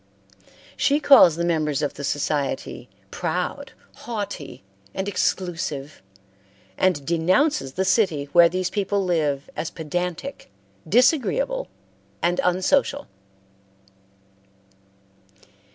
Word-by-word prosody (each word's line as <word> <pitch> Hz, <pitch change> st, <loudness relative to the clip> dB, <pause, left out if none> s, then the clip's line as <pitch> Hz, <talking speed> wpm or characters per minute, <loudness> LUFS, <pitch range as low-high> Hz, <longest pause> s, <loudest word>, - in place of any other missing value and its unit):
She 285 Hz, +1 st, +2 dB
calls 270 Hz, -, +7 dB
the 170 Hz, +1 st, -1 dB
members 155 Hz, -4 st, 0 dB
of 145 Hz, -, -1 dB
the 140 Hz, -, -8 dB
society 145 Hz, 0 st, -2 dB, 0.2 s
proud, -, -, -3 dB, 0.2 s
haughty, 205 Hz, -, -6 dB, 0.3 s
and 190 Hz, -, -3 dB
exclusive, 165 Hz, -7 st, -2 dB, 0.7 s
and 165 Hz, -, +1 dB
denounces 170 Hz, -, +1 dB
the 190 Hz, +4 st, -1 dB
city 185 Hz, -8 st, +2 dB
where 170 Hz, -1 st, +7 dB
these 185 Hz, +1 st, -2 dB
people 200 Hz, -1 st, -1 dB
live 150 Hz, -6 st, 0 dB
as 155 Hz, +1 st, -3 dB
pedantic, 180 Hz, -, -5 dB, 0.4 s
disagreeable, 335 Hz, -, +2 dB, 0.5 s
and 175 Hz, +1 st, +1 dB
unsocial. 185 Hz, +10 st, +1 dB
180 Hz, 90 wpm, -23 LUFS, 155-205 Hz, 0.7 s, calls